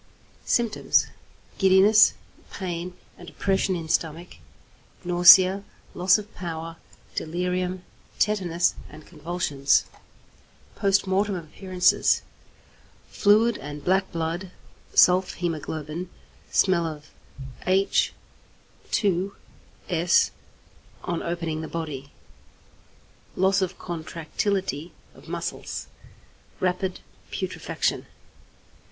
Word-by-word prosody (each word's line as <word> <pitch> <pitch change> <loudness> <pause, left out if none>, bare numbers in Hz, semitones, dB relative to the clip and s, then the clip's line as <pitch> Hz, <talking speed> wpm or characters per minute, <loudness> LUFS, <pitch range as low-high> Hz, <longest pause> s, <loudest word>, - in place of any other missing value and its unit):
Symptoms. 235 -3 +2 0.5
Giddiness, 195 +3 +6 0.4
pain 180 -1 -5 0.2
and 175 - -10
oppression 190 -1 0
in 165 -2 -5
stomach, 165 +2 -2 0.7
nausea, 185 +2 +7 0.3
loss 180 +2 +4
of 210 0 -9
power; 165 -2 -6 0.4
delirium, 180 +2 -2 0.3
tetanus, 180 -5 +1 0.2
and 155 - -13
convulsions. 150 -4 0 0.9
Post 195 0 +2
Mortem 195 +1 +1
Appearances. 180 +2 +1 0.9
Fluid 215 +2 +3
and 145 +1 -8
black 190 +1 +2
blood 165 +3 -3 0.5
(sulph 180 +1 +5
hæmoglobin), 160 0 -4 0.4
smell 180 -4 +2
of 150 -1 -9 0.6
H_S 190 +1 +2 2.9
on 170 -1 -2
opening 165 -2 -3
the 160 - -5
body; 150 -5 -6 1.2
loss 190 +1 +2
of 190 -1 -2
contractility 170 0 -3 0.2
of - - -17
muscles, - - -5 0.7
rapid 185 0 -1 0.3
putrefaction. - - -2
180 Hz, 80 wpm, -25 LUFS, 165-190 Hz, 2.9 s, nausea